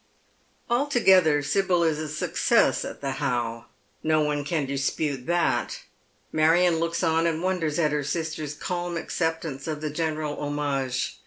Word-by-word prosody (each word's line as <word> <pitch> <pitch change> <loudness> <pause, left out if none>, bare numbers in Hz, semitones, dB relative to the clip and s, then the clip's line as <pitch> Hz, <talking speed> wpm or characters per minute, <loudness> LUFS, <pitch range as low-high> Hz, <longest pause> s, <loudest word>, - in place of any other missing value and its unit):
Altogether 190 - +4
Sibyl 180 +3 +2
is 160 -2 +1
a 155 -1 -4
success 155 +1 +2
at - - -7
the 140 -1 -2
How. 120 -2 -2 0.3
No 155 0 +2
one 150 -1 0
can 150 0 -1
dispute 140 0 -2
that. 175 0 0 0.5
Marion 165 +2 +3
looks 170 +1 -1
on 165 0 +2
and 165 +1 -1
wonders 175 -5 0
at 155 -3 +2
her 150 -1 0
sister's 155 -1 -3
calm 175 +1 -3
accept 165 0 -2
ance 135 -2 -6
of 155 -2 -3
the 155 -1 -3
general 155 -1 -2
homage. 140 -3 -2
155 Hz, 150 wpm, -26 LUFS, 145-170 Hz, 0.5 s, Altogether